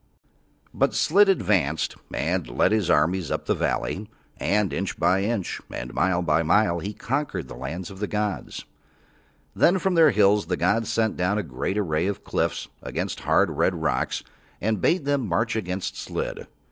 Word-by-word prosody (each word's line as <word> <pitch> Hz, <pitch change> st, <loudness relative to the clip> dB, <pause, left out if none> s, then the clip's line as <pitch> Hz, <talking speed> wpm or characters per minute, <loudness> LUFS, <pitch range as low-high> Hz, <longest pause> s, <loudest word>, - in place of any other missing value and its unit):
But -, -, +1 dB
Slid 200 Hz, +5 st, +4 dB
advanced 90 Hz, -, +1 dB, 0.2 s
and -, -, -1 dB
led -, -, +2 dB
his 105 Hz, -5 st, +1 dB
armies 85 Hz, +3 st, +2 dB
up -, -, -2 dB
the -, -, +2 dB
valley, 105 Hz, +2 st, -2 dB, 0.3 s
and 100 Hz, -6 st, +1 dB
inch 100 Hz, +7 st, -3 dB
by 90 Hz, +3 st, +2 dB
inch 105 Hz, -2 st, -2 dB
and 60 Hz, +1 st, -6 dB
mile 90 Hz, 0 st, +1 dB
by 80 Hz, 0 st, +2 dB
mile 85 Hz, +1 st, +3 dB
he 100 Hz, +4 st, -4 dB
conquered 135 Hz, +7 st, -3 dB
the -, -, -9 dB
lands 85 Hz, +8 st, -6 dB
of 95 Hz, -, -11 dB
the 105 Hz, -, -2 dB
gods. 105 Hz, -1 st, -3 dB, 0.9 s
Then 180 Hz, -, +4 dB
from 190 Hz, 0 st, 0 dB
Their 165 Hz, -3 st, +6 dB
hills 105 Hz, -, +3 dB
the 90 Hz, 0 st, -1 dB
gods 110 Hz, +6 st, +1 dB
sent 110 Hz, -1 st, 0 dB
down 90 Hz, +4 st, +1 dB
a 105 Hz, -, -1 dB
great 75 Hz, +7 st, -3 dB
array 85 Hz, -3 st, 0 dB
of 100 Hz, -, -3 dB
cliffs -, -, -1 dB
of -, -, -3 dB
hard, -, -, +2 dB
red 95 Hz, -, +1 dB
rocks, 80 Hz, -6 st, -1 dB, 0.4 s
and 105 Hz, -1 st, -1 dB
bade 175 Hz, -4 st, +2 dB
them 140 Hz, -5 st, 0 dB
march 105 Hz, +7 st, 0 dB
against 95 Hz, -3 st, -3 dB
Slid. -, -, -5 dB
100 Hz, 170 wpm, -25 LUFS, 85-110 Hz, 0.9 s, Their